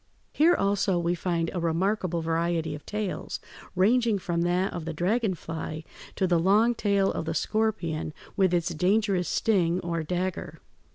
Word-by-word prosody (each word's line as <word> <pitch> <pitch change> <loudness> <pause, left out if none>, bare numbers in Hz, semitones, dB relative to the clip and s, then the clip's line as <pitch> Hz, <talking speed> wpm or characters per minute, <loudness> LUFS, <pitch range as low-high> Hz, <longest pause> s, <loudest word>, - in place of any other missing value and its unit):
Here 335 +4 +5
also 195 -2 +1
we 170 0 +1
find 170 -1 -1
a 180 - -2
remarkable 170 +1 0
variety 165 -1 0
of 150 -1 -8
tails, 210 -2 -3 0.4
ranging 225 +3 +3
from 175 -3 -2
that 180 +2 +1
of 170 -3 -5
the 165 - -3
dragon 195 +4 +1
fly 160 -1 -6 0.3
to 190 - +1
the 175 -2 +3
long 210 +7 +4
tail 200 -3 +1
of - - -3
the 160 0 -3
scorpion 170 -7 -1 0.2
with 190 -2 +3
its 175 -1 +1
dangerous 190 +2 +1
sting 180 -6 +2
or 170 -1 -2
dagger. 175 -1 -3
180 Hz, 160 wpm, -27 LUFS, 165-200 Hz, 0.4 s, Here